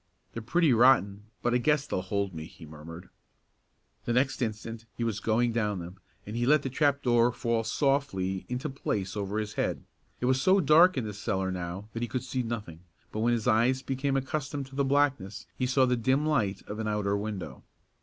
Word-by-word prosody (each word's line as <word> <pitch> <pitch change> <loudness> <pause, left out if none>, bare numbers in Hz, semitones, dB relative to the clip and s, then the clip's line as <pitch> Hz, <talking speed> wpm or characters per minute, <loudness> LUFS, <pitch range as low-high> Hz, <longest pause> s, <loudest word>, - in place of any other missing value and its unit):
"They're 115 - -5
pretty 150 +5 +3
rotten, 105 -5 +4 0.2
but 120 - +1
I 125 - +3
guess 150 +2 +2
they'll 95 - -2
hold 100 0 -2
me," 80 -1 -6
he 80 0 -13
murmured. 80 +3 -11 1.0
The 120 - 0
next 130 +2 +1
instant 115 0 -4
he 120 - -2
was 110 -3 -1
going 115 +2 +1
down 105 -3 0
them, 90 +2 -8 0.3
and 105 - -6
he 120 +1 0
let 150 0 +4
the 135 - -3
trap 140 +1 +1
door 120 -1 +4
fall 115 -1 -1
softly 110 -10 0
into 125 +4 -3
place 105 -9 -3
over 100 0 -3
his 105 -1 -3
head. - - -2 0.4
It - - -2
was 130 +1 +2
so 190 +6 +4
dark 165 +2 +6
in 130 - 0
the 105 - -5
cellar 95 -2 -2
now 90 +2 -5
that 115 - -4
he 120 - -1
could 130 +1 -3
see 130 0 -2
nothing, 105 -9 -5 0.3
but 110 - -4
when 120 +2 +2
his 115 -1 -1
eyes 125 +4 +3
became 135 +1 -1
accustomed 140 +1 -3
to 135 - -12
the 140 - +1
blackness 135 -8 0
he 130 - -1
saw 130 +1 +3
the 125 0 +2
dim 130 +5 +1
light 110 -11 0
of 105 +1 -7
an 110 - -2
outer 105 -1 0
window. 100 -2 -5
115 Hz, 210 wpm, -28 LUFS, 105-135 Hz, 1.0 s, dark